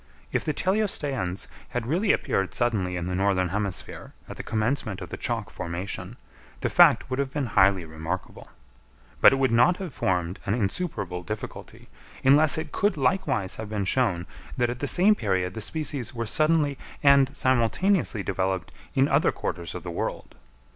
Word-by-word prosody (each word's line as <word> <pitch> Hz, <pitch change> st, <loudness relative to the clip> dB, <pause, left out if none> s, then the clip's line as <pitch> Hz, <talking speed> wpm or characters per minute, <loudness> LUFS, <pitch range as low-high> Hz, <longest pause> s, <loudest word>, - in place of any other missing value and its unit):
If -, -, 0 dB
the -, -, 0 dB
teleosteans 145 Hz, -, 0 dB, 0.2 s
had 120 Hz, -2 st, -3 dB
really 180 Hz, -, +2 dB
appeared 95 Hz, -1 st, 0 dB
suddenly 105 Hz, -7 st, 0 dB
in 85 Hz, -1 st, -3 dB
the 90 Hz, -, -3 dB
northern 95 Hz, -1 st, +1 dB
hemisphere 100 Hz, 0 st, -4 dB
at -, -, -8 dB
the -, -, -6 dB
commencement 110 Hz, -2 st, -1 dB
of -, -, -8 dB
the -, -, -5 dB
chalk -, -, -3 dB
formation, 90 Hz, +5 st, -5 dB, 0.4 s
the -, -, 0 dB
fact -, -, +5 dB
would 130 Hz, +1 st, -3 dB
have 140 Hz, -1 st, 0 dB
been 145 Hz, -1 st, -2 dB
highly 95 Hz, -5 st, +3 dB
remarkable; 80 Hz, +4 st, -6 dB, 0.7 s
but -, -, +9 dB
it -, -, +2 dB
would 135 Hz, -2 st, +1 dB
not 120 Hz, +10 st, +4 dB
have 185 Hz, -7 st, -6 dB
formed 90 Hz, -1 st, -1 dB
an 100 Hz, -, +2 dB
insuperable 100 Hz, -, -2 dB
difficulty, 105 Hz, +5 st, -8 dB, 0.4 s
unless 145 Hz, +3 st, +5 dB
it 160 Hz, -, -4 dB
could 205 Hz, -1 st, +1 dB
likewise 145 Hz, -, 0 dB
have 110 Hz, -1 st, -6 dB
been 105 Hz, -2 st, -2 dB
shown 95 Hz, -6 st, +1 dB, 0.3 s
that 120 Hz, -1 st, +1 dB
at 120 Hz, -, -6 dB
the 145 Hz, -, -2 dB
same 190 Hz, +8 st, +5 dB
period 95 Hz, -, -1 dB
the 110 Hz, -, -6 dB
species 135 Hz, -1 st, -2 dB
were 115 Hz, 0 st, -2 dB
suddenly 150 Hz, +2 st, +2 dB, 0.2 s
and 140 Hz, 0 st, +5 dB
simultaneously 130 Hz, -, +2 dB
developed 95 Hz, -1 st, -2 dB, 0.2 s
in 135 Hz, 0 st, +4 dB
other 145 Hz, +2 st, +3 dB
quarters 85 Hz, -3 st, -5 dB
of -, -, -6 dB
the -, -, -5 dB
world. -, -, -4 dB
115 Hz, 170 wpm, -26 LUFS, 95-140 Hz, 0.7 s, but